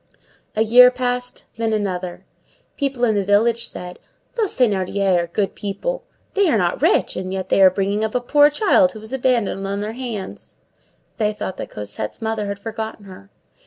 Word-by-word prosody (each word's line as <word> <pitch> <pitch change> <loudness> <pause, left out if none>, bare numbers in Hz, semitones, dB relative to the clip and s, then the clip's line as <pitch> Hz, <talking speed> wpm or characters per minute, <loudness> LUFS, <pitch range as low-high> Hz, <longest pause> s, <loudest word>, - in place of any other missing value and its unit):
A 220 - +3
year 250 +3 +8
passed; 250 0 -3
then 225 -1 0
another. 185 -4 -3 0.5
People 275 -4 -2
in 225 -3 +4
the 200 -1 +1
village 220 +4 +2
said:— 180 0 -8 0.3
"Those 445 -5 -1
Thénardiers 195 -4 +2
are - - -6
good 195 +4 -1
people. 205 - -4 0.3
They 400 -3 +3
are 235 - +3
not 175 -3 0
rich, - - +2
and 185 0 -4
yet 190 -1 -4
they - - +3
are 190 - +9
bringing 200 +3 -1
up 220 +1 -2
a - - +3
poor 290 +4 +4
child 300 -5 +3
who 215 - -9
was 220 +4 -8
abandoned 235 -7 0
on 200 +1 -3
their 215 +2 -4
hands!" 235 -6 -7 0.6
They 215 -2 +1
thought 210 -3 -5
that - - -6
Cosette's 105 +1 -6
mother 220 -2 -2
had 200 0 -4
forgotten 220 0 -6
her. 100 - -13
215 Hz, 185 wpm, -21 LUFS, 195-245 Hz, 0.6 s, are